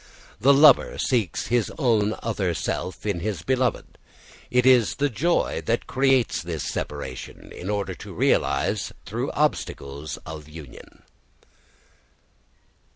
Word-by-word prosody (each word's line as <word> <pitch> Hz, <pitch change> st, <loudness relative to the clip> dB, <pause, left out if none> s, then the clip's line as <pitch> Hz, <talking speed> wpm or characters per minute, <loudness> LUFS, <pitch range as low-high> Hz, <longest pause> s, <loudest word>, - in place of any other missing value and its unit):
The 130 Hz, +7 st, +5 dB
lover 145 Hz, +2 st, +6 dB
seeks 115 Hz, -, -1 dB
his 120 Hz, -2 st, +1 dB
own 110 Hz, -6 st, +2 dB
other 100 Hz, -6 st, -1 dB
self 95 Hz, -, -4 dB
in 100 Hz, -5 st, -1 dB
his 95 Hz, -3 st, -3 dB
beloved. 130 Hz, -3 st, -1 dB, 0.5 s
It 125 Hz, 0 st, +2 dB
is 125 Hz, -4 st, +5 dB
the 145 Hz, -1 st, 0 dB
joy 170 Hz, +10 st, 0 dB
that 115 Hz, +1 st, 0 dB
creates 130 Hz, -, +2 dB
this 85 Hz, -2 st, -4 dB
separation, 70 Hz, -4 st, -6 dB
in 90 Hz, -, -7 dB
order 100 Hz, -2 st, -1 dB
to -, -, -10 dB
realise -, -, +1 dB
through -, -, -3 dB
obstacles 70 Hz, +2 st, -2 dB
of 75 Hz, -1 st, -8 dB
union. 75 Hz, -5 st, -12 dB
105 Hz, 120 wpm, -24 LUFS, 80-125 Hz, 0.5 s, lover